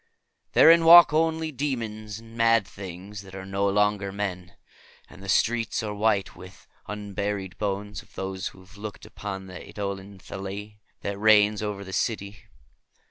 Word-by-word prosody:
Therein 165 +1 +7
walk 170 -1 +9
only 160 0 +1
daemons 115 -7 -4
and 115 0 -13
mad 115 -2 +3
things 95 +1 -8
that 95 -1 -12
are 95 0 -7
no 100 +1 0
longer 105 0 +1
men, 95 -3 -4 0.5
and 95 - -15
the 100 - -8
streets 115 +3 +1
are 105 -1 -3
white 100 -3 +1
with 90 0 -13 0.2
the - - -4
unburied 100 -2 -4
bones 105 0 -3
of - - -23
those 95 -1 -4
who 95 - -11
have 95 +2 -17
looked 105 0 -8
upon 95 -2 -6
the 95 -1 -9
eidolon 100 -1 -6
Lathi, 100 +2 -7 0.2
that 100 0 -4
reigns 105 -1 +5
over 105 -2 -3
the 95 -1 -9
city." 100 -3 -2
105 Hz, 160 wpm, -26 LUFS, 95-110 Hz, 0.5 s, walk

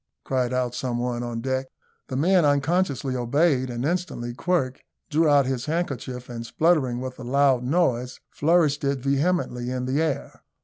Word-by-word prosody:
cried 130 -2 0
out 125 -1 -1
some 125 -1 -2
one 120 0 -2
on 120 -1 -4
deck. 130 +1 -1 0.4
The 130 - -5
men 175 +6 +4
unconsciously 145 -2 +1
obeyed, 130 +2 +2
and 120 +1 -3
instantly 160 -8 -2
Quirk 140 -2 -1 0.3
drew 155 +1 +3
out 140 -2 +5
his 130 -1 -2
handkerchief, 135 -6 -3
and, 115 -1 -6
spluttering 135 -2 +1
with 130 0 -6
a - - -7
loud 135 0 +3
noise, 125 -4 0
flourished 155 -2 +2
it 140 0 +1
vehemently 140 -2 0
in 125 0 -2
the 135 +4 0
air. 155 -4 -3
130 Hz, 165 wpm, -25 LUFS, 125-150 Hz, 0.4 s, out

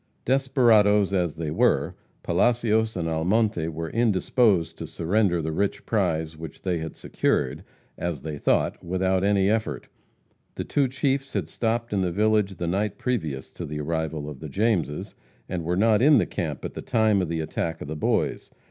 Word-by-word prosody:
Desperadoes 115 -7 +4
as 90 -5 0
they 80 -2 -4
were, - - +2 0.3
Palacios 110 +3 +2
and 85 -2 -2
Almonte 85 +2 +1
were 80 0 -5
indisposed 105 -5 +2
to - - -5
surrender 90 -1 +1
the 80 - -2
rich 100 +5 -1
prize 80 -7 0
which 80 -1 -10
they 90 -3 0
had 80 0 -6
secured, - - -1 0.4
as 85 -6 -3
they 75 -1 -4
thought, - - +1
without 95 +1 0
any 100 -1 +3
effort. 110 +1 -1 0.7
The - - -3
two 140 -2 +1
chiefs 135 +1 -1
had 95 -7 -1
stopped 115 +4 -2
in 100 - +1
the 90 -2 0
village 105 0 +2
the 85 - -3
night 100 +4 -1
previous 80 - -3
to - - -7
the 75 0 -5
arrival 80 -1 -2
of 75 -3 -8
the 80 - -7
Jameses, 95 -5 -1 0.3
and 90 -2 -3
were 90 +2 -1
not 110 +1 +4
in 145 +2 +6
the - - +3
camp 75 -5 -4
at - - -5
the - - -6
time 110 -4 +2
of 90 - -2
the 85 -1 -2
attack 80 +1 -3
of - - -7
the 80 - -4
Boys. 75 - -1
95 Hz, 180 wpm, -25 LUFS, 80-110 Hz, 0.7 s, in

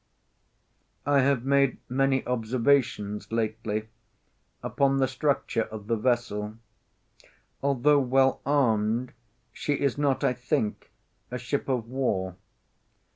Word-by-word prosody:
I 145 0 +4
have 135 -2 +2
made 140 -1 +3
many 135 +1 +1
observations 115 -3 0
lately 110 -1 -2 0.7
upon 135 0 +1
the 135 -1 +3
structure 130 -2 0
of 105 -2 -9
the 115 +2 0
vessel. 110 -3 -1 1.1
Although 140 +1 +3
well 130 0 +2
armed, 120 -4 +1 0.4
she 145 - -1
is 140 -1 0
not, 140 -2 +1
I - - +3
think, 120 -4 -2 0.4
a 125 - -4
ship 125 +4 -3
of 125 -4 -1
war. 105 -8 -1
125 Hz, 110 wpm, -27 LUFS, 110-135 Hz, 1.1 s, I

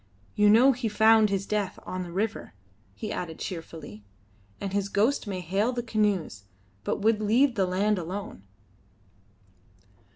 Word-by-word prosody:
You 210 0 +4
know 240 +6 +7
he 245 -3 -2
found 220 0 +5
his 195 0 -1
death 205 -2 -2
on 185 - -4
the 175 -1 -6
river," 205 - -3 0.4
he 100 - -5
added 165 -3 -5
cheerfully, 165 - -8 0.6
"and 195 -1 -4
his 200 0 -1
ghost 220 +5 +1
may 190 -2 -3
hail 195 +7 0
the 240 -1 -3
canoes, 205 - -1 0.4
but - - -2
would 220 0 +3
leave 240 +6 +3
the 195 -5 +1
land 195 +2 +1
alone." 185 - -6
205 Hz, 150 wpm, -27 LUFS, 185-220 Hz, 0.6 s, know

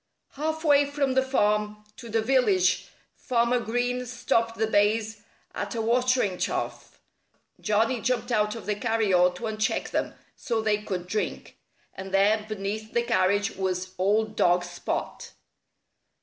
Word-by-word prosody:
Half 315 +2 -3
way 290 -2 +4
from 285 -2 0
the 265 - +3
farm 210 -5 0
to 235 - -10
the 225 0 0
village 205 -8 +2 0.3
Farmer 240 0 +1
Green 245 +2 -2
stopped 230 -1 0
the 220 - +1
bays 215 0 +1 0.3
at - - -4
a 225 - -1
watering 245 -4 +1
trough. - - -3 0.6
Johnnie 225 +3 +1
jumped 250 +2 -1
out 210 -1 +1
of 230 - -8
the 210 - 0
carryall 205 -5 +2
to 205 - -10
uncheck 215 -1 -1
them, - - -2 0.2
so 230 -2 -2
they 215 -1 +1
could 185 -4 -4
drink. 210 +4 -4 0.4
And 190 0 -8
there, 205 +3 +3
beneath 215 +1 -4
the 235 - +2
carriage, 205 -2 +1
was 185 -1 -2
old 215 +3 +1
dog 175 -2 +3
Spot! 175 0 -5
220 Hz, 145 wpm, -26 LUFS, 205-240 Hz, 0.6 s, way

